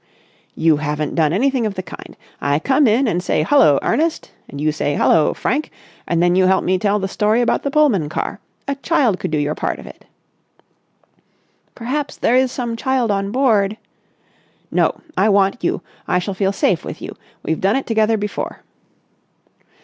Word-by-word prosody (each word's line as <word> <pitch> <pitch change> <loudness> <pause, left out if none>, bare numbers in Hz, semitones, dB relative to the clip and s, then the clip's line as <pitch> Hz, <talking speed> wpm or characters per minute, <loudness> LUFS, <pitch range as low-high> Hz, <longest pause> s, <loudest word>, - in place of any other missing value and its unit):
"You 160 -2 +3
haven't 150 0 -2
done 155 -3 +2
anything 250 +4 +1
of 200 - -5
the 185 - -4
kind. - - -11 0.2
I 140 0 +1
come 265 - +2
in 240 +5 +3
and 180 -4 0
say 180 - 0
'Hullo, 155 - +5
Ernest!' 325 +2 0 0.2
and 140 - -8
you 155 +1 +1
say 145 -1 -2
'Hullo, 160 - +3
Frank!' 290 +6 -1 0.4
and 170 0 +1
then 175 0 +3
you 185 0 +4
help 190 0 +3
me 185 0 +1
tell 205 +1 +1
the 195 -2 -2
story 210 +3 +1
about 240 - +1
the 280 - -2
Pullman 270 - +2
car. - - -4 0.3
A 280 - 0
child 275 - +1
could - - -3
do 155 - -1
your 145 0 0
part - - -3
of - - -11
it." - - -13 1.7
"Perhaps 275 +5 -3
there 245 - +2
is 260 0 +3
some 240 -3 -3
child 250 -2 0
on 195 0 -1
board...." 215 -5 +2 0.9
"No. - - +1
I 205 +3 +3
want 195 +2 +2
you. - - -1 0.2
I - - +2
shall 190 +2 -2
feel 195 0 0
safe 190 -3 0
with - - -7
you. - - -8 0.3
We've 160 - -2
done 195 +2 +2
it 270 - -1
together 220 -1 +2
before." 210 0 -5
200 Hz, 185 wpm, -19 LUFS, 175-250 Hz, 1.7 s, Hullo